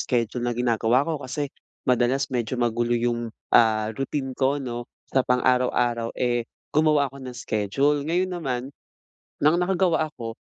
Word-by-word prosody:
schedule 120 -1 0
na 120 -1 -1
ginagawa 120 +1 +2
ko 160 -2 -2
kasi 140 +2 -4 0.3
madalas 125 +2 +1
medyo 120 +1 -1
magulo 120 0 +1
'yong, 120 0 -1 0.2
ah, 110 -1 +4
routine 135 +1 -3
ko, 135 +2 +1
'no? 120 -3 -5 0.2
Sa 135 - +4
pang-araw-araw, 125 -2 +1
eh, 120 -2 0 0.2
gumawa 150 -3 +3
ako - - -11
ng 125 - -8
schedule. 120 +6 +1
Ngayon 180 +2 +1
naman 135 -8 -2 0.8
nang 155 +4 +4
nakagawa 180 -2 +2
ako, 115 -2 -7
125 Hz, 145 wpm, -25 LUFS, 120-140 Hz, 0.8 s, ah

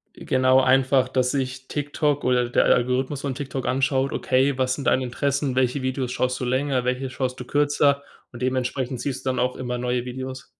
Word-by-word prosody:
Äh, - - -11
genau 130 0 +4
einfach, 130 0 +3
dass 130 -1 +1
sich 130 -1 -3
TikTok 145 0 -1
oder 125 -1 +2
der 120 - +2
A - - +3
Algorithmus 130 +3 0
von 140 -2 -2
TikTok 135 -1 -5
anschaut: 135 +1 +1
Okay, 130 +1 +1
was 130 -1 +1
sind 140 - -6
deine 130 - +3
Interessen? 140 +2 -1
Welche 130 +1 +1
Videos 130 -1 -2
schaust 125 0 -1
du - - -1
länger? 130 0 0
Welche 125 +1 -1
schaust 130 -1 -3
du - - -5
kürzer? 145 0 +2 0.3
Und 120 0 -9
dementsprechend 130 0 -1
siehst 130 0 -4
du - - +2
dann 130 - -2
auch 125 +1 0
immer 125 -1 -3
neue 125 0 -1
Videos. 130 +1 -6
130 Hz, 205 wpm, -24 LUFS, 125-135 Hz, 0.3 s, genau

